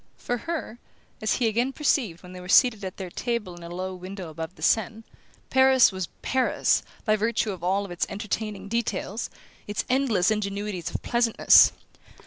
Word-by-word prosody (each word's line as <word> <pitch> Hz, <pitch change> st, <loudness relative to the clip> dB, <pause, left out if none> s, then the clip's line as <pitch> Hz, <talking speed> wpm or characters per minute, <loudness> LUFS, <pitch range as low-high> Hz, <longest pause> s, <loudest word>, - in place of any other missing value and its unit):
For 245 Hz, -, -2 dB
her, 310 Hz, -8 st, -4 dB, 0.4 s
as 215 Hz, -, +1 dB
he 245 Hz, -, +1 dB
again 240 Hz, +5 st, 0 dB
perceived 245 Hz, -, 0 dB
when 180 Hz, 0 st, -11 dB
they 180 Hz, -, -9 dB
were 180 Hz, -, -10 dB
seated 220 Hz, -1 st, +5 dB
at 185 Hz, -1 st, -6 dB
their 185 Hz, -2 st, -6 dB
table 235 Hz, -6 st, -3 dB
in 175 Hz, -, -12 dB
a 170 Hz, -, -8 dB
low 185 Hz, +2 st, -4 dB
window 185 Hz, -1 st, -8 dB
above 160 Hz, +3 st, -7 dB
the -, -, -11 dB
Seine, 225 Hz, 0 st, +1 dB, 0.5 s
Paris 265 Hz, -2 st, +6 dB
was 190 Hz, -2 st, -4 dB, 0.2 s
"Paris" 260 Hz, -1 st, +2 dB, 0.2 s
by 215 Hz, -2 st, +3 dB
virtue 220 Hz, 0 st, 0 dB
of 185 Hz, -3 st, -8 dB
all 195 Hz, +3 st, +1 dB
its 175 Hz, -, -1 dB
entertaining 205 Hz, -1 st, -4 dB
details, 220 Hz, -1 st, -2 dB, 0.4 s
its 205 Hz, 0 st, -2 dB
endless 235 Hz, -8 st, +2 dB
ingenuities 200 Hz, -4 st, -2 dB
of -, -, -5 dB
pleasantness. 235 Hz, -2 st, +5 dB
210 Hz, 170 wpm, -26 LUFS, 185-235 Hz, 0.5 s, Paris